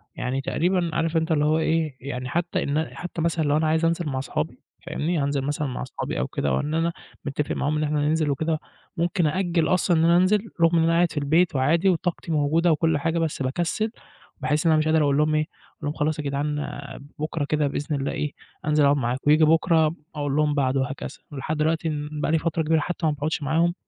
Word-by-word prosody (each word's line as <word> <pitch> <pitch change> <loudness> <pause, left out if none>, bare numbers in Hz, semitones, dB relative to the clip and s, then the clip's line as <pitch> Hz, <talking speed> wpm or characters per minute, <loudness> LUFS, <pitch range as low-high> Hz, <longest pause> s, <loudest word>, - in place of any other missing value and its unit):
يعني 130 +2 -2
تقريبًا 175 +3 0
عارف 165 0 0
أنت 160 +1 0
اللي 150 -2 +3
هو 155 +1 +3
إيه، 160 -3 0
يعني 125 -1 -5
حتى 175 +5 -1
إن 150 +3 0
حتى 175 -2 -5
مثلًا 165 0 +1
لو 145 0 +2
أنا 155 0 +1
عايز 160 +1 +2
أنزل 170 0 0
مع 130 -1 -2
صحابي 135 - -3 0.3
فاهمني، 170 +3 -1
هانزل 140 0 0
مثلًا 145 +2 -2
مع 125 - -4
صحابي 130 - -4
أو - - -1
كده 70 - -2
أو 65 - +1
إن 150 - -3
أنا 165 +1 +1 0.3
متفق 145 +1 -2
معاهم 150 +2 0
إن 155 - 0
إحنا 150 0 0
هننزل 150 +1 +1
وكده، 160 +3 -1 0.4
ممكن 170 0 +1
أأجل 170 0 +1
أصلًا 180 -1 +2
إن 160 - +3
أنا 170 +1 +5
أنزل 185 +4 +4 0.2
رغم 165 +1 +5
إن 160 - +4
أنا 165 - +3
قاعد 170 0 +3
في - - -9
البيت 160 +3 +2
وعادي 160 +8 +3
وطاقتي 175 -1 -1
موجودة 160 +3 +2
وكُلّ 160 0 +2
حاجة، 165 +3 0
بس 160 -4 -2
باكسّل 175 +11 -1 0.5
باحس 150 +3 0
إن 165 - +5
أنا 155 - +4
مش 155 - +1
قادر 155 0 +3
أقول 140 -1 +2
لهم 155 +1 +2
إيه، 155 - +3
أقول - - -19
لهم: 145 - -1
"خلاص 150 0 -1
يا - - -2
جدعان 145 +1 -1 0.6
بُكرة 155 0 -2
كده 150 0 +1
بإذن 145 +2 -2
الله 140 0 -2
إيه، 150 -1 -3 0.3
أنزل 150 0 +3
أقعد 140 +1 +4
معاكم"، 125 +1 -1
وييجي 155 +2 +6
بُكرة 160 0 +3 0.2
أقول 145 -2 -1
لهم 150 0 +2
بعده 135 -1 +1
وهكذا 135 +1 -4 0.2
لحد 145 +2 -3
دلوقتي 160 +2 +1
إن 150 -1 -3
بقى 150 - 0
لي 165 - +4
فترة 165 0 -1
كبيرة 160 +1 +2
حتى 175 +2 -3
ما 155 - +3
باقعدش 150 +2 -2
معاهم، 165 +4 +2
155 Hz, 230 wpm, -24 LUFS, 145-165 Hz, 0.6 s, وييجي